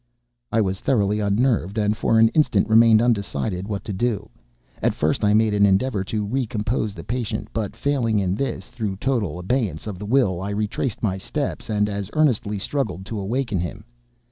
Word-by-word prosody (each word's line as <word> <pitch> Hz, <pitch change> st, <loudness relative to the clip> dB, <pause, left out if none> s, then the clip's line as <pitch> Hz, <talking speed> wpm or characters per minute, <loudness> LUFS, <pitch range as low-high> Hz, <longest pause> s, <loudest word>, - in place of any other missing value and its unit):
I 115 Hz, -, +3 dB
was 95 Hz, -2 st, -1 dB
thoroughly 105 Hz, -5 st, +1 dB
unnerved, 105 Hz, -1 st, +1 dB
and 105 Hz, 0 st, +2 dB
for 115 Hz, 0 st, +2 dB
an 110 Hz, 0 st, +6 dB
instant 115 Hz, -8 st, +2 dB
remained 115 Hz, 0 st, +6 dB
undecided 100 Hz, -4 st, -1 dB
what 100 Hz, -3 st, -3 dB
to 105 Hz, -, -5 dB
do. 105 Hz, 0 st, -1 dB, 0.5 s
At -, -, +1 dB
first 80 Hz, +7 st, 0 dB
I 105 Hz, 0 st, +4 dB
made 110 Hz, -1 st, +3 dB
an 100 Hz, 0 st, +3 dB
endeavor 100 Hz, +2 st, +2 dB
to 105 Hz, +1 st, -2 dB
recompose 110 Hz, -2 st, -1 dB
the 85 Hz, -, -8 dB
patient; 115 Hz, 0 st, -3 dB
but, 110 Hz, -3 st, -3 dB
failing 125 Hz, -6 st, 0 dB
in 95 Hz, -2 st, +1 dB
this 135 Hz, +7 st, -3 dB
through 105 Hz, -5 st, -3 dB
total 110 Hz, -, -1 dB
abeyance 105 Hz, +3 st, -1 dB
of 100 Hz, -4 st, -6 dB
the 105 Hz, -, -6 dB
will, 105 Hz, -8 st, +2 dB
I 100 Hz, -, -3 dB
retraced 105 Hz, +4 st, -2 dB
my 95 Hz, -3 st, 0 dB
steps 135 Hz, +1 st, -4 dB
and 105 Hz, -1 st, +1 dB
as 100 Hz, -1 st, -4 dB
earnestly 120 Hz, -9 st, +1 dB
struggled 95 Hz, -4 st, -3 dB
to 105 Hz, +1 st, -4 dB
awaken 110 Hz, 0 st, -1 dB
him. 90 Hz, +4 st, -5 dB
105 Hz, 185 wpm, -23 LUFS, 100-115 Hz, 0.5 s, an